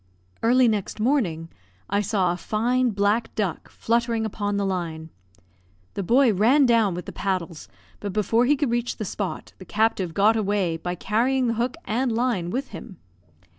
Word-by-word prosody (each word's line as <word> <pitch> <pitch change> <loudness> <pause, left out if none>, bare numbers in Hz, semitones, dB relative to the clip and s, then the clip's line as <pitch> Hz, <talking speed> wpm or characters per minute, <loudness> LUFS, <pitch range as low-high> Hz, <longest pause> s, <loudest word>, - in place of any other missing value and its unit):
Early 245 +2 +4
next 215 -1 -2
morning, 210 - 0 0.4
I 200 +1 +1
saw 190 -3 +1
a - - -5
fine 240 +7 0
black 205 +2 0
duck 200 -6 -3
fluttering 230 -1 0
upon 205 -1 -2
the 200 - 0
line. 165 -4 -4 0.8
The - - -3
boy 240 +4 +4
ran 245 +9 +4
down 225 -6 +3
with 180 - -6
the - - -7
paddles, 180 -4 -3 0.3
but 205 - -4
before 220 +4 +2
he 290 +4 +4
could 280 -3 -1
reach 240 0 -1
the 215 - -4
spot, 195 0 -5
the - - -9
captive 205 -5 0
got 210 +3 +4
away 200 -6 0
by 175 +2 -4
carrying 245 +8 +1
the 230 - +1
hook 240 +6 -2
and 245 +3 0
line 225 -7 0
with 265 +8 -3
him. 195 -7 -10
215 Hz, 170 wpm, -24 LUFS, 190-240 Hz, 0.8 s, Early